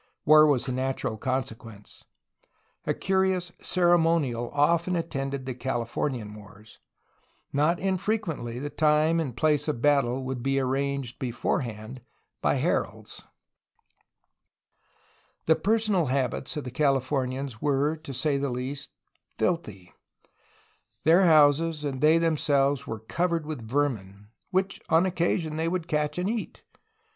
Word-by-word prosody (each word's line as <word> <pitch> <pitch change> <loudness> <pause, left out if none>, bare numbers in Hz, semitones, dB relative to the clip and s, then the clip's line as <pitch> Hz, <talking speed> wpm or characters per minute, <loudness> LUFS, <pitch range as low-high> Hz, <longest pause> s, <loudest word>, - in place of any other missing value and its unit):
War 155 0 +7
was 130 -5 +2
the 130 - -3
natural 130 -3 -2
consequence. 115 -3 -5 0.8
A - - +2
curious 190 -2 0
ceremonial 165 -9 +2
often 170 +5 +2
attended 140 -5 -3
the 130 - -3
Californian 120 -2 -3
wars. 105 0 -15 0.7
Not 155 +5 +2
infrequently 185 - -2
the 145 +3 -5
time 155 +2 +3
and 135 -7 -3
place 150 +2 +2
of 150 -6 -1
battle 135 -2 +2
would 130 -1 -4
be 135 +2 +1
arranged 135 -1 -2
beforehand 120 -1 -3 0.4
by - - +2
heralds. - - -2 2.2
The 160 - +5
personal 210 -5 +1
habits 130 +3 -1
of 150 - -3
the 125 - -6
Californians 135 -3 -1
were, 145 +2 +1
to 155 -2 -10
say 140 +2 0
the 140 0 -1
least, 130 +3 -4 0.5
filthy. 105 - -2 1.1
Their 170 +4 +5
houses 155 0 +4
and 135 -3 -3
they 155 +2 +5
themselves 145 -4 +1
were 110 -1 -5
cov 170 +10 -1
ered 170 -2 -1
with 145 -8 -7
vermin 105 -8 -2
— - - -45
^which 190 +1 -1
on 165 +3 +4
occasion 170 -3 -1
they 160 +1 0
would 175 -1 -2
catch 150 0 -1
and 180 +1 -1
eat 225 +1 -4
145 Hz, 130 wpm, -27 LUFS, 125-165 Hz, 2.2 s, War